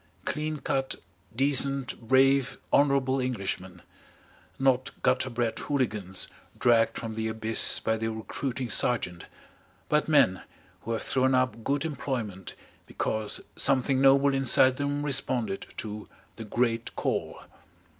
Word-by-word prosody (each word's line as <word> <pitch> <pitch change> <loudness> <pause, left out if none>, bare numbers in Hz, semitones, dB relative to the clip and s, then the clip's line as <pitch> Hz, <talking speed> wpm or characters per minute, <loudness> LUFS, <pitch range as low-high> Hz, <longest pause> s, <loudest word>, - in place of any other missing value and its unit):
Clean 155 0 -2
cut, 135 -1 -1 0.4
decent, 135 0 +1
brave, 135 +3 +3 0.2
honourable 140 -2 +3
Englishmen 95 -7 -4 0.7
not 135 0 +2
gutter 130 - +2
bred 120 -2 -2
Hooligans 105 -9 -2 0.3
dragged 115 -2 +3
from 115 -1 -5
the 110 0 -2
abyss 110 0 +2
by 110 - 0
the 110 0 -2
recruiting 120 +3 -4
sergeant, 95 -5 0 0.6
but 150 0 +2
men 145 -12 +4 0.4
who 115 - -4
have 115 - -3
thrown 130 0 +2
up 125 -3 0
good 140 +5 0
employment 120 - -4 0.3
because 110 -1 -2
something 130 0 +2
noble 135 +1 +5
inside 130 -1 +4
them 145 +1 -2
responded 125 -7 -1
to 105 -1 -6 0.3
the 115 - -8
Great 115 +1 -1
Call. - - -2
125 Hz, 120 wpm, -28 LUFS, 110-135 Hz, 0.7 s, noble